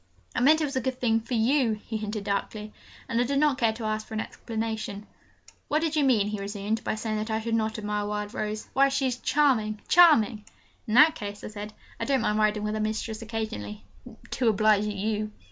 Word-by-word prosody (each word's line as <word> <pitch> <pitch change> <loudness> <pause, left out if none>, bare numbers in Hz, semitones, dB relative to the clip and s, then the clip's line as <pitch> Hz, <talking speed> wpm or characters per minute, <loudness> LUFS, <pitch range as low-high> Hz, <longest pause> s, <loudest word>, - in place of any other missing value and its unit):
'I - - +1
meant 305 +6 +5
it - - +2
was 275 -1 -5
a 260 - +1
good 260 +1 -3
thing 225 -2 +2
for 230 +2 -4
you!' 235 +1 +2
he 225 - -5
hinted 215 -1 -3
darkly, 210 +1 -3 0.3
and 230 - +1
I - - +4
did 275 +3 -1
not 290 -2 +2
care 230 -2 +3
to 225 +1 -8
ask 215 0 -2
for 220 - -7
an - - -1
explanation. 220 -2 -4 0.6
'What 305 +2 +1
did 320 -1 0
you 300 - +3
mean,' 225 -7 +3
he 210 -1 -4
resumed, 205 +2 -3
'by - - -1
saying 215 0 -3
that 215 +1 -3
I 220 0 0
should 225 +1 -3
not 220 0 0
admire 210 -1 -2
Wild 210 0 -4
Rose? 215 0 -4
Why, 275 +1 +4
she 270 0 0
is 250 -2 -1
charming 245 -8 +2
charming!' 245 -11 +5 0.4
'In 215 - -1
that 305 +4 +8
case,' 205 0 -7
I - - -5
said, 210 0 -7 0.3
'I - - -2
don't 270 -2 +1
mind 210 -1 +1
riding 210 0 +2
with 210 0 -1
her 215 - -2
mistress 215 +1 -3
occasionally 210 - -5 0.5
to 250 - 0
oblige 215 0 +3
you.' 210 +1 -2
220 Hz, 225 wpm, -27 LUFS, 210-245 Hz, 0.6 s, that